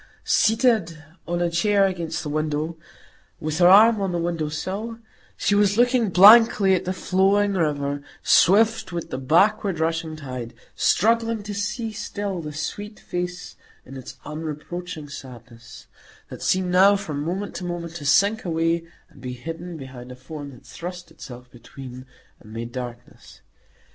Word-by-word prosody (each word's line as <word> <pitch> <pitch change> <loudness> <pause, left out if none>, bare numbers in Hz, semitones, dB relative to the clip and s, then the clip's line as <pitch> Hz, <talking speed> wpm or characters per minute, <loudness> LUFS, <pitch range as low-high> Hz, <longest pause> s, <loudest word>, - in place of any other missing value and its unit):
Seated 220 - +2 0.2
on 175 0 -1
a 170 - +1
chair 200 +3 +3
against 175 -3 -3
the 150 - -5
window, 155 +2 -2 0.6
with 155 +1 -3
her 175 - +6
arm 215 +3 +7
on 195 -2 -1
the 175 - -1
windowsill 175 +7 -3 0.4
she - - +1
was 205 0 +3
looking 245 -2 +3
blankly 205 +1 +7
at 185 - 0
the 185 - -1
flowing 195 +2 +2
river, 145 -5 -1 0.2
swift 220 +4 +4
with 170 -1 -5
the 130 - -3
backward 180 - +2
rushing 160 0 -1
tide, 125 -5 -7 0.2
struggling 230 +1 +1
to 205 0 -6
see 210 +3 -3
still 205 -3 -4
the 150 -1 -6
sweet 205 +8 -6
face 180 0 -5 0.3
in 135 - -11
its 130 -2 -9
unreproaching 155 +2 -6
sadness, 125 -4 -12 0.4
that - - -9
seemed 185 -1 +1
now 195 +3 +6
from 155 -8 -4
moment 190 +5 -4
to - - -6
moment 175 -1 -5
to 150 - -9
sink 200 +10 +3
away 165 -1 0 0.2
and - - -19
be 125 -1 -5
hidden 165 +7 -7
behind 130 -3 -10
a - - -9
form 145 +2 -9
that 125 -3 -15
thrust 180 +1 -8
itself 125 0 -11
between, 130 +1 -11 0.3
and 105 - -15
made 115 +1 -6
darkness. 120 -1 -9
170 Hz, 155 wpm, -23 LUFS, 145-200 Hz, 0.6 s, arm